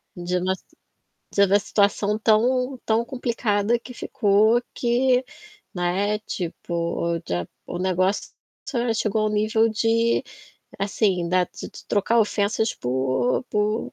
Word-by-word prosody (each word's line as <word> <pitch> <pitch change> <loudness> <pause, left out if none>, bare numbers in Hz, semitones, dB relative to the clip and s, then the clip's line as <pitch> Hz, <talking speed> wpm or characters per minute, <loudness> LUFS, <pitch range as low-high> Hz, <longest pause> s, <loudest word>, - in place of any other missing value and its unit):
De 175 +1 -2
uma 185 +1 0
s 190 - -4 0.7
de 200 - +5
uma 200 +2 +4
situação 205 +1 +1
tão 250 +4 +2
tão 225 +1 +2
complicada 235 -3 0
que 250 +1 -11
ficou 220 0 +2
que, 250 +1 +2 0.5
né, 190 +4 0
tipo, 170 -3 -3
já 90 -1 -2 0.2
o 175 - -5
negócio 185 +2 0 0.6
chegou 215 0 0
ao 215 - +1
nível 215 +2 +2
de 230 +2 +2 0.6
assim, 195 -3 +1
da 185 0 +3
de - - -9
de - - -13
trocar 215 +3 +2
ofensas 220 +1 +1
por 130 - 0
por 210 +1 -1
210 Hz, 125 wpm, -23 LUFS, 180-225 Hz, 0.7 s, de